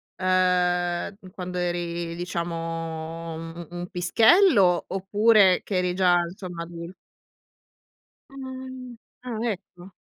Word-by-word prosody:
uhm, 180 Hz, 0 st, +1 dB
quando 180 Hz, -1 st, -6 dB
eri, 175 Hz, -1 st, -2 dB
diciamo, 165 Hz, -1 st, -4 dB
un 165 Hz, +1 st, -7 dB
un 170 Hz, -2 st, -8 dB
un 175 Hz, 0 st, -5 dB
pischello, 200 Hz, -, +4 dB
oppure 195 Hz, 0 st, +4 dB
che 190 Hz, -3 st, 0 dB
eri 180 Hz, 0 st, 0 dB
già, 180 Hz, -1 st, +4 dB
insomma, 175 Hz, -1 st, -7 dB
adul 170 Hz, +1 st, -9 dB, 1.4 s
Mh. 260 Hz, -2 st, -8 dB, 0.3 s
Ah, 245 Hz, -3 st, -4 dB
ecco. 190 Hz, -4 st, -5 dB
180 Hz, 100 wpm, -25 LUFS, 170-195 Hz, 1.4 s, pischello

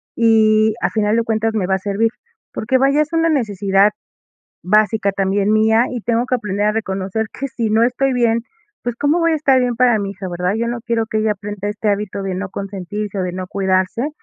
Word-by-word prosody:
y 220 Hz, -1 st, +4 dB
a -, -, +1 dB
final 215 Hz, 0 st, +1 dB
de 230 Hz, -, +2 dB
cuentas 225 Hz, 0 st, -1 dB
me 200 Hz, -5 st, -1 dB
va 190 Hz, -, +2 dB
a 190 Hz, -, -3 dB
servir. 205 Hz, +3 st, 0 dB, 0.4 s
Porque 250 Hz, +4 st, 0 dB
vaya, 275 Hz, +3 st, +3 dB
es 305 Hz, +2 st, -2 dB
una 330 Hz, 0 st, +2 dB
necesidad 205 Hz, -6 st, +2 dB, 0.7 s
básica 210 Hz, +1 st, +2 dB
también 195 Hz, +1 st, +1 dB
mía, 220 Hz, +2 st, +4 dB
y 245 Hz, -, -4 dB
tengo 235 Hz, +2 st, 0 dB
que 255 Hz, -, 0 dB
aprender 210 Hz, -2 st, -1 dB
a -, -, +3 dB
reconocer 195 Hz, 0 st, -2 dB
que 275 Hz, -, -4 dB
si 235 Hz, -4 st, -3 dB
no 220 Hz, +2 st, +3 dB
estoy 255 Hz, +2 st, +1 dB
bien, 235 Hz, -2 st, +2 dB, 0.4 s
pues, 240 Hz, -1 st, -3 dB
¿cómo 290 Hz, +6 st, +1 dB
voy 335 Hz, 0 st, +2 dB
a -, -, +2 dB
estar 275 Hz, -4 st, +3 dB
bien 245 Hz, -1 st, 0 dB
para 245 Hz, -2 st, +4 dB
mi 200 Hz, -1 st, -3 dB
hija, 195 Hz, -1 st, -7 dB
verdad? 180 Hz, +3 st, -1 dB
Yo 235 Hz, +1 st, -1 dB
no 240 Hz, 0 st, -3 dB
quiero 230 Hz, -1 st, 0 dB
que 220 Hz, 0 st, -2 dB
ella 215 Hz, 0 st, +1 dB
aprenda 205 Hz, 0 st, -5 dB
este 210 Hz, +1 st, -4 dB
hábito 200 Hz, -1 st, -2 dB
de 190 Hz, -1 st, -3 dB
no 190 Hz, 0 st, -4 dB
consentirse 200 Hz, +1 st, -5 dB
o -, -, 0 dB
de 180 Hz, -, -3 dB
no 185 Hz, 0 st, -5 dB
cuidarse. 190 Hz, -, 0 dB
215 Hz, 225 wpm, -18 LUFS, 200-235 Hz, 0.7 s, y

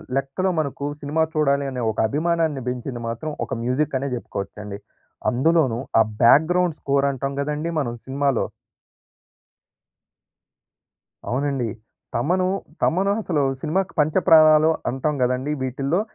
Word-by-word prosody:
లెక్కలో 135 Hz, +8 st, 0 dB
మనకు 140 Hz, -1 st, -3 dB, 0.2 s
సినిమా 155 Hz, +3 st, +1 dB
చూడాలి 140 Hz, -2 st, +2 dB
అనే 125 Hz, -1 st, -4 dB
ఒక -, -, -12 dB
అభిమానాన్ని 160 Hz, 0 st, 0 dB
పెంచింది 125 Hz, -1 st, -4 dB
మాత్రం 120 Hz, +7 st, -4 dB
ఒక -, -, -6 dB
మ్యూజిక్ 135 Hz, +3 st, 0 dB
అనే 140 Hz, -, -3 dB
చెప్పుకోవచ్చండి. 105 Hz, -2 st, -6 dB, 0.5 s
అందులోనూ, 130 Hz, -2 st, +2 dB, 0.2 s
ఆ -, -, +8 dB, 0.2 s
బ్యాక్‌గ్రౌండ్ 165 Hz, +6 st, +4 dB
స్కోర్ 140 Hz, 0 st, +1 dB
అంటాం 135 Hz, +1 st, -3 dB
కదండీ 150 Hz, +3 st, -2 dB
మనం 120 Hz, -4 st, -2 dB
సినిమాలో. 135 Hz, -2 st, 0 dB, 2.9 s
అవునండి 135 Hz, -2 st, -1 dB, 0.5 s
తమను, 180 Hz, +9 st, +1 dB, 0.3 s
తమను 195 Hz, +4 st, +2 dB
అసలు 155 Hz, -7 st, 0 dB, 0.2 s
సినిమాకి 185 Hz, +5 st, -1 dB
పంచప్రాణాలు 155 Hz, -1 st, +5 dB, 0.2 s
అంటాం 140 Hz, +4 st, -1 dB
కదండీ! 130 Hz, +4 st, 0 dB
వీటిల్లో 135 Hz, -, -1 dB
140 Hz, 110 wpm, -23 LUFS, 130-160 Hz, 2.9 s, ఆ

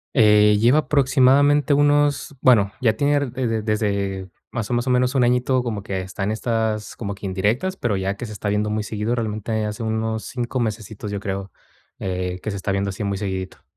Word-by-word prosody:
Eh, 105 Hz, -1 st, +6 dB
lleva 120 Hz, +6 st, +4 dB
aproximadamente 145 Hz, +1 st, +4 dB
unos, 145 Hz, 0 st, +2 dB
bueno, 105 Hz, -7 st, +4 dB
ya 110 Hz, -3 st, +3 dB
tiene 145 Hz, +3 st, +2 dB
ra 140 Hz, -4 st, -3 dB
e 130 Hz, -2 st, -1 dB
de 115 Hz, -1 st, -1 dB
desde 100 Hz, -3 st, -1 dB, 0.2 s
más 115 Hz, -3 st, -4 dB
o 125 Hz, -, -1 dB
más 120 Hz, +1 st, 0 dB
o 130 Hz, -, 0 dB
menos 125 Hz, +2 st, +2 dB
un 125 Hz, -, +4 dB
añito 125 Hz, +1 st, +2 dB
como 110 Hz, -5 st, -3 dB
que 95 Hz, -3 st, -3 dB
está 95 Hz, +2 st, -8 dB
en 100 Hz, -, 0 dB
estas 110 Hz, -1 st, -1 dB
como 100 Hz, -3 st, -5 dB
que 100 Hz, -, -9 dB
indirectas, 105 Hz, -, 0 dB
pero 115 Hz, -, 0 dB
ya 95 Hz, +1 st, -1 dB
que 120 Hz, -, -6 dB
se 110 Hz, -, -9 dB
está 105 Hz, 0 st, -3 dB
viendo 105 Hz, +1 st, 0 dB
muy 105 Hz, 0 st, -1 dB
seguido, 110 Hz, +3 st, -2 dB
realmente 110 Hz, -1 st, -2 dB
hace 105 Hz, +2 st, -5 dB
unos 110 Hz, 0 st, -2 dB
5 125 Hz, 0 st, -3 dB
mesecitos, 110 Hz, -2 st, -4 dB
yo 100 Hz, -, -3 dB
creo, 100 Hz, -2 st, -4 dB, 0.5 s
eh, 90 Hz, -1 st, -3 dB
que 110 Hz, -, -2 dB
se 100 Hz, -, -4 dB
está 95 Hz, +1 st, -2 dB
viendo 100 Hz, 0 st, 0 dB
así 100 Hz, +3 st, -5 dB
muy 100 Hz, -1 st, -1 dB
seguidito. 95 Hz, -2 st, -5 dB
110 Hz, 215 wpm, -22 LUFS, 100-125 Hz, 0.5 s, Eh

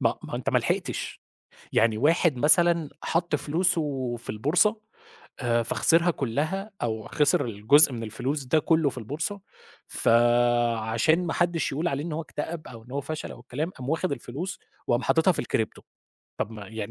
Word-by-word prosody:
ما -, -, +3 dB
ه -, -, -8 dB
ما -, -, -9 dB
هو -, -, -1 dB
أنت -, -, -2 dB
ما -, -, +4 dB
لحقتش، -, -, -3 dB, 0.5 s
يعني 110 Hz, -1 st, +3 dB
واحد 155 Hz, +2 st, +3 dB
مثلًا 165 Hz, +2 st, +4 dB
حط 165 Hz, -1 st, 0 dB
فلوسه 145 Hz, -4 st, -1 dB
في 115 Hz, -, -15 dB
البورصة، 170 Hz, -, +2 dB, 0.6 s
آآ 120 Hz, -2 st, +1 dB
فخسرها 170 Hz, +8 st, +3 dB
كلّها، 155 Hz, -, -2 dB
أو 110 Hz, -2 st, -3 dB
خسر 150 Hz, -2 st, +2 dB
الجزء 120 Hz, +7 st, +5 dB
من 115 Hz, -2 st, -5 dB
الفلوس 125 Hz, +6 st, -3 dB
ده 135 Hz, +5 st, +2 dB
كلّه 160 Hz, 0 st, +2 dB
في 130 Hz, -, -8 dB
البورصة، 150 Hz, -, -4 dB, 0.5 s
فعشان 120 Hz, +5 st, +2 dB
ما 165 Hz, -, -1 dB
حدش 175 Hz, -2 st, 0 dB
يقول 155 Hz, +5 st, 0 dB
عليه 140 Hz, -1 st, -2 dB
إن 165 Hz, -, -4 dB
هو 160 Hz, -, -2 dB
اكتئب، 155 Hz, +1 st, -6 dB
أو 115 Hz, -2 st, -11 dB
إن 125 Hz, -, -13 dB
هو 140 Hz, -, -1 dB
فشل، 155 Hz, +2 st, -5 dB
أو -, -, -13 dB
الكلام، 140 Hz, +7 st, -4 dB
قام 130 Hz, -8 st, -9 dB
واخد 160 Hz, 0 st, 0 dB
الفلوس، 160 Hz, +9 st, -5 dB, 0.3 s
وقام 120 Hz, -, +1 dB
حاططها 160 Hz, +3 st, +3 dB
في -, -, -2 dB
الcrypto، 110 Hz, -2 st, -2 dB, 0.6 s
طَب -, -, -1 dB
ما 105 Hz, -3 st, -9 dB
يعني، 110 Hz, -1 st, -5 dB
145 Hz, 180 wpm, -26 LUFS, 120-165 Hz, 0.6 s, الجزء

